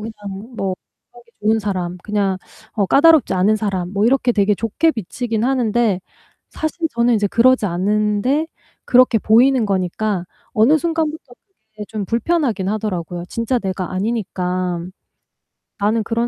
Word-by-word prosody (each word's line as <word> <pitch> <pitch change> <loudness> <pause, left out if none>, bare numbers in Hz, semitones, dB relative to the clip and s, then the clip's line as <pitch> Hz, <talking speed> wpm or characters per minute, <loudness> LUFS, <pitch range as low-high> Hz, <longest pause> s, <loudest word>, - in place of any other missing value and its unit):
그냥 210 +1 -8
뭐 190 -3 -1 0.4
하기 240 0 -17 0.2
좋은 220 +1 +3
사람 185 -4 -3
그냥 200 -3 -1 0.3
어 205 -3 0
까다롭지 295 - +5
않은 195 +4 +3
사람 195 -4 -3
뭐 205 +1 +1
이렇게 255 0 +2
되게 210 -1 +2
좋게 230 - +1
비치긴 225 +1 -3
하는데 240 -6 +1 0.5
사실 320 +1 -2
저는 235 +1 +3
이제 210 -2 +1
그러지 235 +1 +3
않은데 210 - 0 0.4
그렇게 250 -2 +4
보이는 235 +2 +4
거니까 190 0 -1 0.3
어느 255 +9 +4
순간부터 315 -5 -3 0.4
그게 215 -1 -7
좀 215 -2 -4
불편하긴 230 - 0
하더라고요 180 -5 -3
진짜 230 +2 -1
내가 190 -3 -4
아니니까. 185 -4 -2 1.0
'나는 215 +2 +1
그런 230 +2 -1
215 Hz, 315 characters per minute, -19 LUFS, 195-245 Hz, 1.0 s, 까다롭지